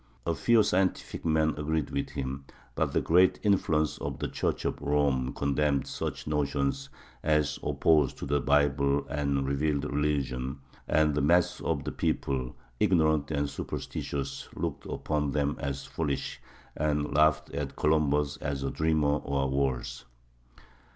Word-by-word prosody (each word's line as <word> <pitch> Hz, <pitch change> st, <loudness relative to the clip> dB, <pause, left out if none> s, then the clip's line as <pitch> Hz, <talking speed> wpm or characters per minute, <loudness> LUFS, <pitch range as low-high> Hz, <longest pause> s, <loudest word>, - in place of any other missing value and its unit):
A 85 Hz, -, +1 dB
few 115 Hz, +5 st, +4 dB
scientific 95 Hz, -1 st, 0 dB
men 80 Hz, -1 st, +3 dB
agreed 80 Hz, 0 st, -1 dB
with 70 Hz, -, -2 dB
him, 65 Hz, 0 st, -5 dB, 0.3 s
but -, -, 0 dB
the -, -, +1 dB
great 90 Hz, +3 st, +4 dB
influence 80 Hz, -7 st, +2 dB
of -, -, -4 dB
the -, -, -2 dB
Church -, -, -2 dB
of -, -, -2 dB
Rome 70 Hz, -3 st, +1 dB
condemned 70 Hz, 0 st, 0 dB
such -, -, -4 dB
notions 75 Hz, -, -1 dB, 0.3 s
as 75 Hz, -1 st, +1 dB
opposed 75 Hz, -5 st, +2 dB
to -, -, -5 dB
the 70 Hz, +1 st, +1 dB
Bible 70 Hz, 0 st, +2 dB
and 70 Hz, -1 st, 0 dB
revealed 70 Hz, +1 st, 0 dB
religion; 70 Hz, -3 st, -1 dB, 0.3 s
and 75 Hz, -1 st, +3 dB
the 75 Hz, -, +1 dB
mass 85 Hz, +5 st, +3 dB
of -, -, -1 dB
the -, -, -3 dB
people, 65 Hz, -2 st, -1 dB, 0.2 s
ignorant 80 Hz, -7 st, +3 dB
and 75 Hz, -2 st, 0 dB
superstitious, 70 Hz, -1 st, -5 dB
looked -, -, -4 dB
upon 75 Hz, -2 st, -1 dB
them 75 Hz, -1 st, +1 dB
as 70 Hz, -1 st, -3 dB
foolish, 70 Hz, -4 st, -3 dB, 0.3 s
and 75 Hz, -1 st, 0 dB
laughed 75 Hz, +1 st, +3 dB
at 70 Hz, 0 st, -4 dB
Columbus 75 Hz, -1 st, +2 dB
as 70 Hz, -1 st, -3 dB
a 70 Hz, -, -1 dB
dreamer 75 Hz, -2 st, +2 dB
or 70 Hz, -1 st, -1 dB
worse. 65 Hz, -2 st, -1 dB
75 Hz, 145 wpm, -29 LUFS, 70-75 Hz, 0.3 s, few